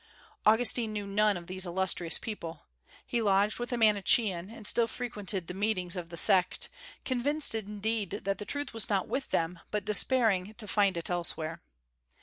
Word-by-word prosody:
Augustine 225 0 +5
knew 210 -1 -4
none 205 0 +1
of 170 - -10
these 185 +1 0
illustrious 175 -2 +1
people. 170 -8 -7 0.4
He 235 - -2
lodged 205 +1 +2
with 240 +1 -4
a 245 - -1
Manichean, 205 -3 +3
and 225 -1 -12
still 230 +2 +3
frequented 205 -7 -3
the 180 - -7
meetings 190 -3 0
of 175 -2 -6
the 170 - -7
sect; 185 +2 +3 0.4
convinced, 280 +4 +1
indeed, 210 -1 -3
that 195 0 -2
the - - -4
truth 285 +1 0
was 225 -3 +1
not 195 -3 0
with 270 - -3
them, 170 +1 -1
but 210 -2 -3
despairing 215 -2 +2
to 215 -2 -4
find 200 -3 +1
it 170 - -2
elsewhere. 165 -2 -2
205 Hz, 170 wpm, -29 LUFS, 185-225 Hz, 0.4 s, Augustine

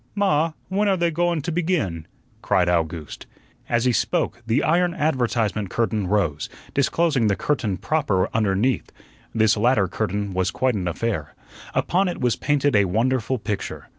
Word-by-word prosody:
"Ma, 165 -5 +2
when 200 +3 0
are 195 -1 +2
they 170 -1 +1
go 175 +2 +1
wun 170 -4 -1
to 170 - -2
begin?" 155 - -1 0.3
cried 90 -1 +2
Owgooste. 80 -3 -2 0.4
As 120 0 +1
he 125 - +4
spoke 120 - 0
the 115 +6 +2
iron 175 +2 +2
advertisement 120 - 0
curtain 110 -3 -1
rose, 90 -7 0 0.2
disclosing 140 -3 +2
the 100 - +2
curtain 110 -9 -1
proper 135 -13 0
underneath. 110 +3 +1 0.4
This 110 -1 +4
latter 110 -2 +3
curtain 100 0 -2
was 95 0 +1
quite 130 +4 0
an 95 -4 -2
affair. 85 -3 -3 0.4
Upon 185 +2 +2
it 175 - -3
was 125 -2 +1
painted 145 -2 +1
a 100 -1 +5
wonderful 120 +6 0
picture. 105 -2 -5
115 Hz, 160 wpm, -23 LUFS, 100-155 Hz, 0.4 s, a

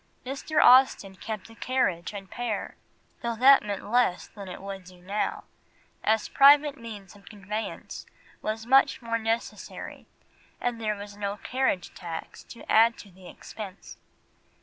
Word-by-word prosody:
Mr. 275 +4 -1
Austen 250 -7 +6
kept 215 +2 -7
a - - -13
carriage 225 -9 -1
and 195 -2 -9
pair, 240 -4 -3 0.5
though 235 -1 -2
that 270 +4 +7
meant 205 -1 -5
less 240 -7 +2
than 200 -2 -10
it 180 - -7
would 195 -1 -7
do 180 0 -15
now, 195 +4 -2 0.6
as 220 0 +2
private 285 +1 +6
means 215 -7 -10
of 200 - -15
conveyance 210 +1 -6 0.3
was 220 +1 -3
much 265 0 +4
more 230 0 -1
necessary 225 +1 -4 0.5
and 240 -2 -2
there 215 -1 0
was 205 0 -9
no 205 0 -3
carriage 250 -7 -1
tax 165 -2 -7
to 235 - -12
add 230 +1 +5
to 200 - -13
the 185 0 -15
expense. 200 -3 -10
215 Hz, 150 wpm, -27 LUFS, 195-240 Hz, 0.6 s, that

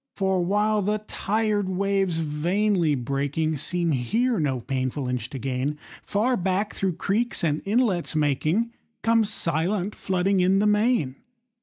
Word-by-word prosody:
For 190 -2 +1
while 210 +3 +1
the 210 +2 0
tired 210 -2 0
waves, 195 -2 0
vainly 165 +2 +1
breaking, 140 +5 -1
Seem 170 +3 0
here 220 - +1
no 135 -5 0
painful 130 +1 -2
inch 125 -1 -3
to 135 - -6
gain, 130 +3 -2 0.2
Far 225 +5 0
back, 190 +1 -1
through 190 -2 -1
creeks 220 +4 -1
and 155 -2 +1
inlets 200 -6 +1
making, 155 - +1 0.3
Comes 225 -2 +3
silent, 180 +5 0
flooding 190 +1 0
in, 185 +2 +3
the 205 - +2
main. 210 - +2
185 Hz, 140 wpm, -25 LUFS, 150-210 Hz, 0.3 s, Comes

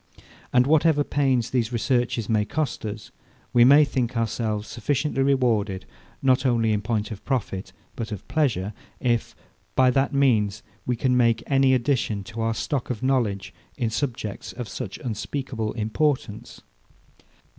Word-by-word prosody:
And 125 0 +4
whatever 155 0 +4
pains 135 -5 +1
these 120 -3 0
researches 120 -1 0
may 110 -2 +2
cost 140 -1 -2
us, 105 0 -7 0.4
we 120 -1 +7
may 145 +4 +7
think 125 -3 -2
ourselves 110 -2 -1
sufficiently 140 +4 -1
rewarded, 115 -8 +1 0.4
not 130 -1 +4
only 115 -4 +2
in 105 - 0
point 105 -1 -2
of 105 - -7
profit 100 -8 -2 0.2
but 115 -2 -5
of 105 -2 -7
pleasure, 110 - 0 0.3
if, 120 -2 0 0.4
by 130 -1 +5
that 135 +3 +1
means, 115 -8 +2 0.2
we 125 - +1
can 125 +2 +1
make 115 -2 +3
any 135 -1 +4
addition 120 -5 0
to 115 +2 -6
our 115 0 0
stock 135 +2 -2
of 125 -1 -4
knowledge, 110 -8 0 0.2
in 115 -2 -1
subjects 115 -5 -3
of 125 -2 -6
such 100 -1 -6
unspeakable 115 -1 -3
importance. 115 0 -2
120 Hz, 145 wpm, -24 LUFS, 110-135 Hz, 0.4 s, we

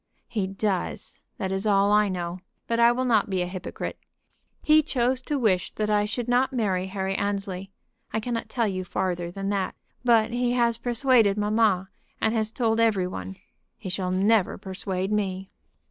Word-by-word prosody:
"He 205 -5 -2
does; 195 -1 -3 0.2
that 190 -1 -3
is 195 +2 -1
all 200 0 +4
I 210 -1 +4
know. 175 -1 -4 0.3
But 230 0 -1
I 235 0 +7
will 255 +2 -1
not 220 -5 +3
be 185 -2 0
a - - -2
hypocrite. 180 0 -6 0.6
He 310 0 +6
chose 255 -3 0
to 290 +3 -2
wish 200 -8 +1
that 215 0 -1
I 205 0 +3
should 235 +3 -3
not 245 +2 +2
marry 195 -7 0
Harry 190 0 -2
Annesley. 195 -1 -2 0.4
I 220 - 0
cannot 230 +1 -3
tell 235 -3 0
you 185 -2 -2
farther 180 -1 -2
than 195 +2 -4
that. 200 -2 -1 0.3
But 230 -2 +4
he 245 0 0
has 235 -2 +2
persuaded 240 -4 +3
mamma, 210 -3 +2 0.3
and 220 - +1
has 220 -2 0
told 225 -1 +1
every 215 -5 +3
one. 95 - -6 0.4
He 190 - -7
shall 185 0 -2
never 195 +2 +2
persuade 190 0 -4
me." 195 -2 -2
205 Hz, 175 wpm, -26 LUFS, 190-230 Hz, 0.6 s, I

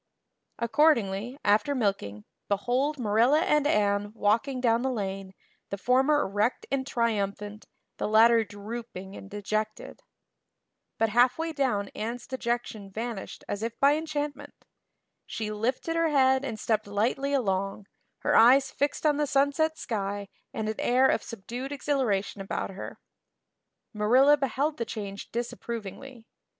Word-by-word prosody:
Accordingly, 235 -3 +2
after 215 +8 +3
milking, 195 - -2 0.2
behold 250 +9 0
Marilla 240 +6 +3
and 300 -3 +2
Anne 205 -4 +1
walking 230 +6 +1
down 235 -2 +2
the 265 - 0
lane, 195 -5 -4 0.3
the 200 - -3
former 265 +7 +3
erect 205 +5 0
and 270 -1 -1
triumphant, 210 -3 -2 0.3
the - - -2
latter 225 +2 +6
drooping 205 -2 -8
and 195 - -10
dejected. 215 +1 -4 1.0
But 225 - +2
halfway 255 +9 +2
down 245 -9 0
Anne's 230 +2 -5
dejection 235 -5 -3
vanished 220 0 -6
as 205 - -3
if 230 +1 -4
by 280 +1 +5
enchantment. 295 -2 -5 0.6
She 215 -1 -4
lifted 250 +9 -2
her 330 -1 +2
head 265 -2 +3
and 225 -6 -4
stepped 215 -1 0
lightly 235 +7 0
along, 195 -5 -1 0.4
her - - +1
eyes 260 +4 +6
fixed 285 +2 -1
on 295 -1 +3
the 295 -1 +1
sunset 285 +4 +2
sky 200 -2 -3 0.2
and 220 - -3
an 215 - -3
air 255 +2 +3
of - - +3
subdued 240 +5 -7
exhilaration 255 -9 -1
about 195 - -3
her. 195 - -8 1.0
Marilla 250 +7 +5
beheld 285 +2 -1
the 235 - -1
change 200 -3 -7
disapprovingly. 235 +1 -6
230 Hz, 135 wpm, -27 LUFS, 205-270 Hz, 1.0 s, latter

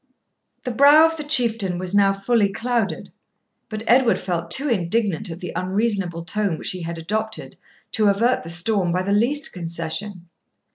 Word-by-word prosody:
The 250 - -3
brow 285 +6 +7
of 325 0 0
the 305 - -5
Chieftain 230 - +1
was 185 +1 -2
now 200 -1 +4
fully 200 +1 +1
clouded; 230 -1 -2 0.6
but 215 0 -5
Edward 245 0 +4
felt 170 -2 -3
too 275 +11 +2
indignant 205 - -1
at 165 +1 -8
the 180 - -5
unreasonable 185 -2 -1
tone 200 -2 -1
which - - -2
he 185 - -6
had 165 0 -5
adopted 215 +6 -4 0.4
to 215 -2 +2
avert 230 +6 +2
the 165 - -9
storm 175 +1 0
by 180 +2 0
the 200 - -2
least 260 +8 +1
concession. 170 +2 -4
200 Hz, 165 wpm, -22 LUFS, 175-230 Hz, 0.6 s, brow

